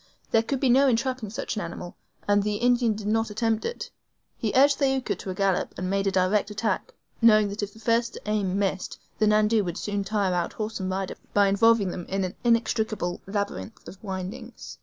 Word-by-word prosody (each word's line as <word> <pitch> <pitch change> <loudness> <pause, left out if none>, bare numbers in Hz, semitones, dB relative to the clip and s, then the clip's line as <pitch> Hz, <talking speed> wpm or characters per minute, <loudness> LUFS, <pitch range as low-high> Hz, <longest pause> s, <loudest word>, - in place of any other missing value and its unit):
There 225 - +5
could 265 +3 -2
be 270 - +2
no 265 +3 +5
entrapping 255 -2 0
such 245 +5 -4
an 210 - -2
animal, 175 0 -7 0.3
and 205 0 +4
the 210 +1 -1
Indian 240 0 +2
did 210 -1 -7
not 225 +1 +1
attempt 220 +1 0
it. 475 - -5 0.4
He - - -2
urged 280 +2 +5
Thaouka 265 -2 +1
to - - -7
a 185 - -3
gallop, 195 -1 0
and 185 0 -2
made 195 0 +1
a - - +2
direct 190 +2 +2
attack, 210 -1 -2 0.3
knowing 215 -3 +6
that 205 +2 -5
if 205 0 -3
the 220 - -16
first 230 +1 0
aim 205 -3 0
missed 195 -2 -2 0.2
the 215 - +3
NANDOU 215 +1 +3
would 175 -3 -4
soon 205 -1 -2
tire 200 -2 0
out 175 -1 -1
horse 215 0 -4
and 190 -1 -2
rider 190 0 -3 0.2
by 200 -1 +5
involving 210 -1 +4
them 175 -1 -6
in 195 0 -1
an 185 0 -3
inextricable 220 -6 0
labyrinth 195 - -4
of 190 - -12
windings. 205 +5 -7
210 Hz, 205 wpm, -26 LUFS, 195-230 Hz, 0.4 s, knowing